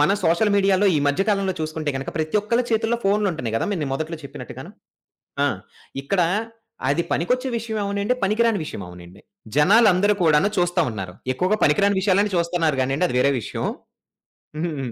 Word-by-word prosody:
మన 150 +7 +4
సోషల్ 170 +6 +3
మీడియాలో 195 0 +3
ఈ - - +2
మధ్య 145 +7 +2
కాలంలో 195 -2 +1
చూసుకుంటే 155 -1 -3
గనుక 135 - -5
ప్రతి 155 +5 -1
ఒక్కరి 235 +4 0
చేతుల్లో 225 +1 +1
ఫోనులుంటున్నాయి 190 - 0
గదా! - - -1
మీరు 155 -7 -2
మొదట్లో 160 +3 -4
చెప్పినట్టుగాను. - - -9 0.7
ఆ! - - +3 0.6
ఇక్కడ 180 +6 0 0.7
అది 145 +5 +1
పనికొచ్చే 255 +10 0
విషయం 220 -1 -4
అవ్వనీయండి, 200 +4 0
పనికిరాని 220 +1 +2
విషయం 105 -9 -7
అవనీయండి. 90 +1 -13 0.4
జనాలందరూ 205 +4 +5
కూడాను 160 +4 +4
చూస్తా 175 0 +1
ఉన్నారు. 95 -4 -6 0.2
ఎక్కువగా 185 +9 +1
పనికిరాని 200 +6 +3
విషయాలను 200 +1 +2
చూస్తున్నారు 170 -3 0
గానియండి. 135 +7 +1
అది 125 - -3
వేరే 140 +2 +3
విషయం. - - -4 1.0
హ్మ్. 140 -8 -3
180 Hz, 155 wpm, -22 LUFS, 150-205 Hz, 1.0 s, జనాలందరూ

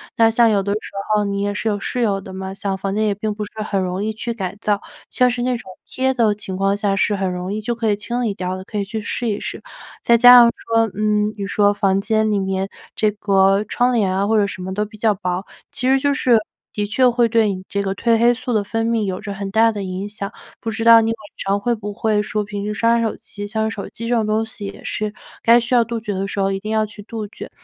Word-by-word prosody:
那 225 -2 +5
像 230 +1 +4
有 200 -2 +2
的 200 - -2
时 210 +2 -3 0.2
候 210 -1 +2
你 200 0 -2
也 205 0 -1
是 210 - -3
有 210 -2 +1
室 225 +5 -3
友 205 -5 +1
的 190 - -10
嘛， 190 0 -5
像 195 0 -3
房 195 +1 -3
间 215 +1 +1
也 210 - +2
并 210 +1 -3
不 210 - -4
是 205 - -8
很 200 -2 -1
容 185 +1 -2
易 220 - -2
去 235 +2 -4
改 195 -3 -5
造， 205 -2 +1 0.3
像 250 0 +3
是 245 0 -2
那 250 0 0
种 220 -5 -12 0.2
贴 265 0 0
的 230 -5 +3
情 205 -2 -6
况 195 +1 +1
下 205 -1 0
是 200 +2 +2
很 195 -2 -1
容 180 +2 -4
易 215 - -2
就 235 +3 -2
可 225 -1 0
以 - - +2
清 240 +4 -2
理 220 -4 0
掉 185 -1 -3
的， 185 - -7
可 210 +2 -6
以 200 - -1
去 220 +2 -4
试 235 +3 -3
一 210 -2 0
试。 - - -6 0.4
再 235 - +4
加 245 +1 +10
上 235 -1 +7
说， 225 -1 +1
嗯， 210 0 +1
你 200 - -3
说 205 0 +3
房 195 -2 +1
间 220 +1 +1
里 205 - +1
面 190 0 -2 0.3
这 215 -1 +2
个 195 -1 +3
窗 250 +1 +1
帘 200 -5 +1
啊 195 +1 +1
或 220 +1 +3
者 205 - +4
什 185 -2 -7
么 190 +1 -4
的 210 +2 0
比 215 +1 -13
较 215 0 +2
薄， 185 0 -3 0.3
其 250 - -2
实 270 - +5
就 285 +1 +1
是 250 -4 +4 0.3
的 210 - -2
确 250 +5 +3
会 240 0 +2
对 225 -2 +2
你 185 0 -7
这 200 - -2
个 195 -1 -2
褪 230 +2 +2
黑 235 +1 +5
素 250 0 -4
的 215 -2 +2
分 225 +2 -2
泌 230 -2 +1
有 185 -1 -3
着 200 - -6
很 195 0 -5
大 225 +3 +4
的 210 -2 -5
影 185 +1 -4
响， 205 -1 -6 0.3
不 225 - -3
知 225 0 -3
道 230 0 +8
你 225 - 0
晚 225 - -4 0.2
上 200 +1 0
会 240 +4 0
不 210 -2 -5
会 210 0 +1
说 210 0 -2
平 205 -1 -5
时 210 - -2
刷 230 +2 +2
手 225 -1 -1
机？ 205 0 -8
像 220 +1 -1
手 205 -3 -6
机 230 - -7
这 240 - +1
种 220 -2 +1
东 215 +1 +1
西 220 -2 -8
也 - - -10
是 210 0 -3 0.3
该 235 +1 +6 0.3
杜 230 -1 -3
绝 210 -2 -4
的 195 +1 -2
时 200 - -4
候 195 0 +1
一 195 - -2
定 215 +2 -5
要 220 0 +2
去 210 0 -11
杜 215 0 -6
绝。 205 - -10
210 Hz, 295 characters per minute, -20 LUFS, 200-225 Hz, 0.4 s, 加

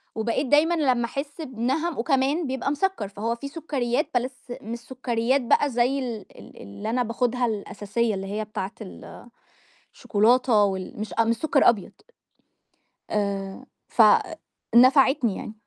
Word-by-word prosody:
وبقيت 230 +5 -1
دايمًا 300 +5 +4
لمّا 255 -6 +1
أحس 280 +6 -6
بِنَهَم 270 +5 -2
وكمان 275 +5 +1
بيبقى 265 +1 -2
مسكَّر، 295 - -1
فهو 220 +4 -3
فيه 280 +4 -7
سكريات 280 -4 -2
بس 250 +2 0 0.3
مش 235 +2 -6
سكريات 250 +1 -1
بقى 285 +4 +2
زي 250 +2 +1
ال 235 -6 -5
ال - - -14
اللي 100 - -7
أنا 245 +2 +1
باخدها 245 +1 0
الأساسية 215 +1 -2
اللي 195 0 -5
هي 215 +2 -3
بتاعة 205 -2 -5
ال 210 +3 -11 0.7
الشوكولاتة 225 +1 +3
وال 190 0 -3
مش 215 0 -5
أ 230 - +3
مش 230 +1 +1
سكر 305 +1 +4
أبيض. 215 -5 -1 1.2
آآ 200 +2 -3 0.2
ف - - +3 0.7
نفعتني 260 -2 +5
يعني. 215 - -7
240 Hz, 140 wpm, -25 LUFS, 215-270 Hz, 1.2 s, نفعتني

